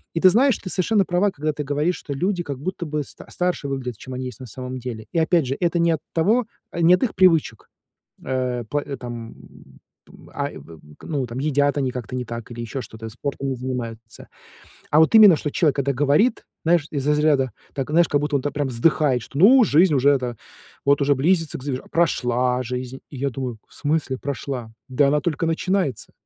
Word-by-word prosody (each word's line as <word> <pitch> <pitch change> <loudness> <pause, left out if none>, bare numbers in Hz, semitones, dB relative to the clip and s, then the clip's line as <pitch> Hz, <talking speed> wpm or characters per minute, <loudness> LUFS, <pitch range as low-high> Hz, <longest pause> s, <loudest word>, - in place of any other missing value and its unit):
И - - +1
ты 185 - +7
знаешь, 255 +4 +4
ты 185 - -8
совершенно 195 +2 +2
права, 180 +4 +2
когда 155 -2 -2
ты 150 - -4
говоришь, 150 +5 0
что 145 - -6
люди 180 +5 -1
как 140 -4 -5
будто 175 +2 -4
бы 150 0 -2
ста - - -11
старше 180 -5 -2
выглядят, 130 -4 -4
чем 130 - -8
они 130 0 -4
есть 125 -4 -9
на 130 - -9
самом 130 +3 -6
деле. 115 -3 -6
И 170 - +1
опять 165 -1 +2
же, 130 +2 -2
это 170 0 +1
не 170 0 +3
от 160 - -1
того, 215 +8 +2 0.2
а, 170 - -3
не 170 +2 +7
от 185 - -3
их 245 - 0
привычек, 165 - +2 0.5
э, 125 -2 -2
пла 145 0 -1
там, 120 -2 -8 0.7
м, - - -16
а, - - -2
и - - -10 0.4
к - - -14
ну 140 -5 -1
там 120 +2 -7
едят 145 0 +1
они 135 -3 0
как-то 125 -1 -6
не 125 -1 -3
так 115 0 -7
или 120 0 -6
еще 115 +3 -5
что-то, 110 -1 -9
спортом 135 +4 -4
не 130 - -2
занимаются, 120 -3 -6 0.6
А 150 - +4
вот 160 - +4
именно, 210 -7 +9
что 150 - -3
человек 150 -2 +1
это 140 0 +1
говорит, 145 - +2 0.2
знаешь, 165 -2 +3
из 140 -2 -3
разряда 150 -4 +2 0.2
так, 135 0 -3
знаешь, 170 +2 +4
как 145 - +1
будто 150 -1 0
он 135 - -2
так 145 - -2
прям 145 -2 -1
вздыхает, 130 +1 +2
что, 140 - -8
ну: 240 - +7
"Жизнь 165 -2 +4
уже 140 +1 +4
это 125 -4 0 0.5
вот 140 +1 +3
уже 140 +1 +3
близится 165 +3 +1
к 130 - -12
завер 135 -2 -4
Прошла 125 -6 +1
жизнь". 125 +1 -5
И 145 - -9
я 140 +2 0
думаю: 125 -3 -5
"В - - -20
смысле 145 -3 -1
прошла? 130 -4 -5 0.2
Да 135 +2 +3
она 150 +1 +2
только 165 0 -1
начинается. 165 -2 -1
145 Hz, 215 wpm, -22 LUFS, 125-165 Hz, 0.7 s, именно